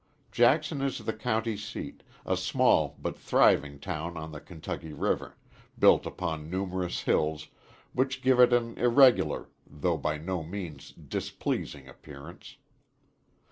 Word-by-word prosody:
Jackson 140 +6 +3
is 135 -1 -1
the 110 - -3
county 110 0 -1
seat, 105 +2 -7 0.2
a - - +1
small - - +2
but - - -4
thriving 70 -1 +3
town 85 +4 -5
on 80 0 -6
the 75 -2 -8
Kentucky 80 -1 -7
River, - - -2 0.4
built - - +5
upon 80 -4 -4
numerous 95 -1 -2
hills, 75 0 0 0.4
which 130 0 -1
give 130 -1 +4
it 125 0 +7
an 120 -1 +1
irregular, 125 +1 +4 0.2
though 80 +3 -1
by 75 +2 -1
no 90 +3 -3
means 85 -3 -7
displeasing 70 -2 -4
appearance. 70 +4 -12
90 Hz, 130 wpm, -29 LUFS, 75-120 Hz, 0.4 s, it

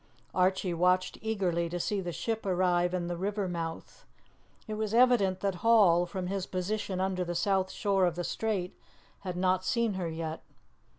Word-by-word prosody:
Archie 185 0 +1
watched 180 +2 +1
eagerly 185 -6 -1
to 175 +1 -3
see 200 +3 -1
the 175 -1 -4
ship 225 +5 -3
arrive 180 -2 +2
in 180 -1 -2
the 175 0 -3
river 200 +2 -2
mouth. 165 -2 -5 0.6
It 215 - -4
was 215 0 -2
evident 235 -7 +4
that 195 -1 0
Hall, 195 -7 +5
from 185 +1 -4
his 195 0 -3
position 185 +1 -2
under 190 -1 0
the 175 0 -4
south 190 0 +1
shore 195 -3 +1
of 170 - -2
the 175 - -3
strait, 195 -3 -2 0.4
had 180 -2 -5
not 185 0 +2
seen 235 +1 +1
her 180 -3 -3
yet. 160 0 -5
185 Hz, 175 wpm, -30 LUFS, 175-200 Hz, 0.6 s, Hall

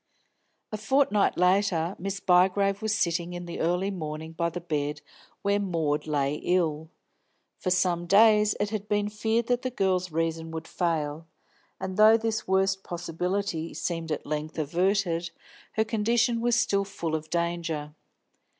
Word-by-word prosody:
A 215 - -3
fortnight 240 -1 +2
later 180 -1 +2
Miss 195 +1 -3
Bygrave 195 +2 +3
was 220 -1 0
sitting 170 0 0
in 175 0 -6
the 170 - -6
early 180 +4 0
morning 160 -3 -5
by 170 +1 -1
the 175 +1 -5
bed 150 -3 -3 0.4
where 200 0 +2
Maud 160 -6 -1
lay 145 -1 0
ill. 160 -3 0 0.7
For 185 - -2
some 180 -1 +1
days 210 +1 +5
it 205 0 -1
had 210 -2 -4
been 205 0 0
feared 220 +2 0
that 245 +1 0
the 255 - -2
girl's 185 -6 0
reason 165 0 -2
would 160 0 -6
fail, 160 -2 -2 0.5
and 190 0 -5
though 215 +1 +7
this 225 -1 -2
worst 190 0 +2
possibility 175 0 -3
seemed 165 -2 -3
at 150 - -3
length 155 +1 -4
averted, 175 +2 0 0.4
her 220 - +1
condition 230 +2 +1
was 240 0 +2
still 235 -5 +2
full 190 -5 -5
of 155 0 -3
danger. 170 -3 -2
180 Hz, 150 wpm, -27 LUFS, 165-205 Hz, 0.7 s, though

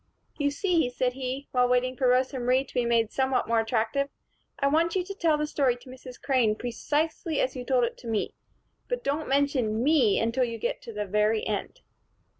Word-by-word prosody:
"You 285 -1 +2
see," 325 -1 +1
said 250 0 -1
he, 265 +1 -4
while 250 -1 +3
waiting 250 +1 +1
for 255 0 +1
Rosa 255 +2 +2
Marie 250 +2 +2
to - - -17
be 245 - +1
made 230 -2 +2
somewhat 265 -1 0
more 230 0 +2
attractive, 225 +5 0 0.5
"I 275 - -1
want 325 +5 +2
you 370 - +1
to 395 +2 -7
tell 330 -6 +2
the 300 - 0
story 275 -5 +1
to 245 +2 -15
Mrs. 255 -1 -11
Crane, 245 -6 +2
precisely 300 - -2
as 260 - 0
you 250 - -5
told 250 -1 +2
it 235 - -2
to 240 - -10
me. 220 -2 -1 0.5
But - - -3
don't 290 +3 -2
mention 265 -5 +1
me 265 -8 +4
until 230 +3 +1
you 230 -2 -2
get 230 - -3
to 230 - -9
the 210 -1 -3
very 210 +2 +1
end." 215 - -4
255 Hz, 210 wpm, -27 LUFS, 235-285 Hz, 0.5 s, me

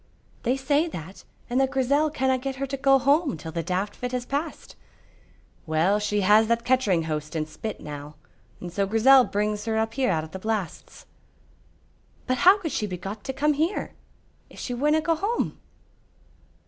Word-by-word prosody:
"They 255 +2 0
say 285 +4 +1
that, 185 - -9 0.2
and 250 +2 +1
that 265 - +2
Grizel 275 +3 +2
canna 265 -3 0
get 270 +1 -4
her 275 +1 -3
to 275 0 -4
go 270 0 +4
home 280 - +2
till 160 +1 -8
the 165 +1 -2
daft 185 +4 -2
fit 250 0 -5
has 250 -1 -2
passed." 290 +5 -4 0.9
"Well, 165 +6 +2
she 210 0 0
has 210 +3 +5
that 235 +1 0
kechering 230 -10 +2
hoast 155 0 -4
and 155 -1 -1
spit 215 +7 -6
now, 150 0 -8 0.4
and 175 -1 -8
so 195 +1 0
Grizel 250 +6 +6
brings 210 +1 -2
her 220 -1 -1
up 220 0 0
here 260 -1 +1
out 160 -3 0
o' - - -7
the 190 +4 -8
blasts." 215 -3 -4 1.2
"But 255 -1 -1
how 375 +3 +7
could 340 -7 -4
she 210 - -1
be 180 -2 -5
got 195 +4 -7
to - - -2
come 295 +3 +1
here, 320 +7 -1 0.6
if - - -16
she 250 - -4
winna 300 +5 +2
go 330 +2 +1
home?" 405 +9 -2
240 Hz, 185 wpm, -25 LUFS, 190-275 Hz, 1.2 s, how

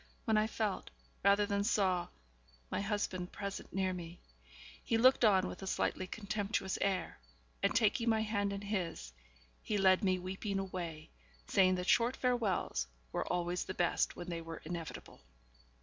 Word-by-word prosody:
when 220 - +3
I 215 0 +3
felt, 215 -3 -2 0.3
rather 200 +1 +5
than 200 -1 0
saw, 190 -5 +2 0.6
my - - 0
husband 195 -3 -2
present 200 -1 -5
near 190 -1 0
me. 175 -1 -7 0.6
He 230 - +1
looked 255 +2 +5
on 190 -4 +5
with - - -7
a 195 - -5
slightly 185 -1 -1
contemptuous 205 -2 -2
air; 190 -3 -1 0.4
and, - - +2
taking 230 +1 +3
my 220 -1 +3
hand 205 -2 0
in 200 0 -4
his, 180 - -3 0.5
he 210 - -1
led 190 +1 +5
me 185 -1 +3
weeping 190 +2 -3
away, 175 -5 -5 0.3
saying 185 -1 +4
that 180 0 -3
short 240 +2 +4
farewells 230 - 0 0.2
were - - -2
always 175 0 -1
the 190 - -5
best 175 -1 +1
when 175 - -7
they 165 -1 -3
were 165 0 -7
inevitable. 165 - -6
195 Hz, 160 wpm, -34 LUFS, 180-210 Hz, 0.6 s, rather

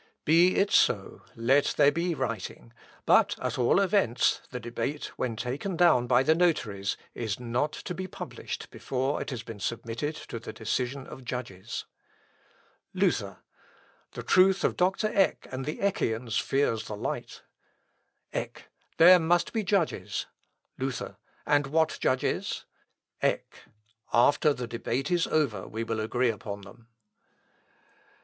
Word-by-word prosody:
_ - - -31 0.2
"Be 170 +4 +5
it 200 - +2
so, - - +2
let 130 +5 +2
there 140 - +6
be 170 +1 -1
writing; 110 - -5 0.3
but, - - +4
at - - -3
all 125 +9 +4
events, 190 - +2
the 125 - -5
debate, 120 +5 -4
when 120 -3 -2
taken 140 - -3
down 160 -9 +4
by 125 +1 +4
the 155 - +4
notaries, 115 - 0 0.2
is 110 -3 -3
not 125 +5 -1
to 180 - -6
be 185 +1 -5
published - - -7
before 135 +2 -2
it - - -4
has 125 -4 -5
been 115 -3 -9
submitted 115 +8 -3
to 115 - -7
the 115 - -8
decision 125 +4 -2
of 130 - -10
judges." 115 -5 -5 1.1
Luther. - - 0 0.7
"The - - -6
truth 190 +1 +4
of - - +1
Dr. 190 +4 +1
Eck 195 -2 +2
and 130 0 -4
the 150 - -3
Eckians 115 - 0
fears 135 -5 0
the 105 - -6
light." - - -5 0.9
Eck. - - -5 0.3
"There 180 +2 +9
must 170 +1 +1
be 220 -2 0
judges." 195 -5 0 0.5
Luther. 135 -1 -4 0.3
"And 145 -1 +2
what 160 +2 +1
judges?" 130 0 0 0.6
Eck. - - -2 0.5
"After 140 +5 +4
the 125 -3 -3
debate 120 +6 -3
is 175 -2 +2
over 145 -9 0
we 110 +1 -4
will 115 -1 -2
agree 120 +3 +1
upon 100 -1 -7
them." 100 +4 -15
130 Hz, 140 wpm, -28 LUFS, 115-165 Hz, 1.1 s, There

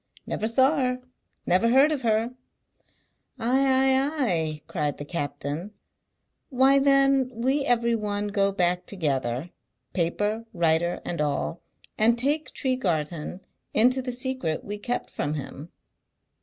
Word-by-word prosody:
"Never 220 - -2
saw 260 +6 +3
her; 250 -2 0 0.5
never 185 +6 +3
heard 270 +5 +5
of 295 -4 -1
her!" 225 0 +1 1.1
"Ay, 245 +4 +1
ay, 265 0 +3 0.2
ay!" 160 -6 -1
cried 150 -4 -2
the 145 - -7
captain. 145 +5 -4 0.7
"Why 270 +1 +4
then 275 -1 +4
we 265 +5 +1
every 235 -2 +2
one 210 -2 -2
go 200 -1 +2
back 180 -2 0
together 140 - -2 0.4
paper, 205 +6 -1
writer, 170 +1 +1
and 170 - -3
all 150 +3 -2 0.4
and 230 +2 +4
take 290 +5 0
Tregarthen 175 - -2 0.3
into 250 +4 +4
the 250 0 -4
secret 250 - -2
we 205 0 -5
kept 245 +4 -3
from 145 +1 -2
him?" 145 +2 -7
215 Hz, 130 wpm, -26 LUFS, 170-260 Hz, 1.1 s, heard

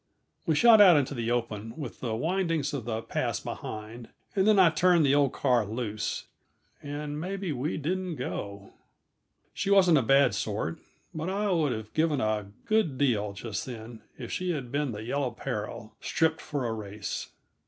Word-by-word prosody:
We 160 - +3
shot 225 +4 +7
out 180 -6 +8
into 140 0 0
the 120 -3 -2
open, 115 -1 -2
with 140 -7 -6
the 115 -3 -2
windings 165 0 0
of 135 -6 -3
the 110 -1 -3
pass - - -1
behind, 110 +2 -7 0.3
and 195 0 +3
then 215 -1 +5
I 180 -4 +7
turned 175 0 +4
the 135 - +4
old 140 -2 +4
car 125 -4 +2
loose, 110 0 -3 0.6
and 145 +1 -5
maybe 190 0 -3
we 145 +3 -2
didn't 180 +3 -2
go! 100 -6 -5 0.8
She - - -2
wasn't 185 -6 +6
a - - +2
bad 135 +2 +4
sort 100 -6 -2 0.3
but 160 +3 -3
I 200 +1 0
would 160 -6 +2
have 110 -2 -5
given 155 -3 +2
a 110 -3 0 0.2
good 215 - +1
deal, 110 -7 +1
just 100 +1 -4
then, 115 -2 -8 0.2
if 120 -3 -7
she 185 0 -2
had 130 -6 -5
been 145 -2 0
the 105 -1 -6
Yellow 135 +3 -1
Peril 110 -1 -5
stripped 160 -1 +1
for 145 -4 -3
a 115 - -1
race. 105 -1 -5
135 Hz, 175 wpm, -28 LUFS, 110-165 Hz, 0.8 s, out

